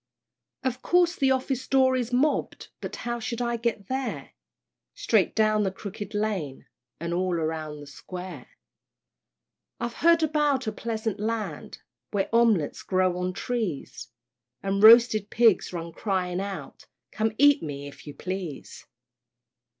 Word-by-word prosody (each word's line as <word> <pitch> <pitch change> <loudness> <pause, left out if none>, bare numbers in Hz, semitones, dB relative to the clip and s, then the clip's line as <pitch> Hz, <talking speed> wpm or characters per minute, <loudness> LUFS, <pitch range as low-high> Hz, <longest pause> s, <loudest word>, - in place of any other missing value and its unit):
Of 260 -2 -2
course 355 0 +3
the 270 - +2
office 260 0 -1
door 260 -1 +4
is 245 -2 -1
mobb'd, 270 +5 0
But - - -5
how 240 0 -2
shall 235 +1 -3
I 235 - 0
get 230 -3 -2
there? 265 +1 -3 0.6
"Straight - - +2
down 215 -1 +3
the 200 - +1
Crooked 205 +2 -8
Lane, 195 -10 -2 0.3
And 170 +1 -3
all 180 0 0
round 155 -2 -3
the - - -10
Square." 170 +1 -9 1.3
I've 235 0 -3
heard 335 0 +5
about 295 -4 +1
a 215 - -1
pleasant 220 -1 -3
Land, 220 +1 -4 0.3
Where 200 -2 -1
omelettes 225 -10 +3
grow 185 -1 +1
on 180 0 -2
trees, 215 - -4 0.6
And 195 0 0
roasted 220 -2 +7
pigs 225 -4 +3
run 170 -1 -5
crying 185 -2 -2
out, 195 -1 -7 0.2
"Come 220 0 -1
eat 285 +1 +6
me, 145 -2 -6
if 145 - -13
you 145 - -8
please." 185 -3 -6
215 Hz, 140 wpm, -26 LUFS, 180-245 Hz, 1.3 s, roasted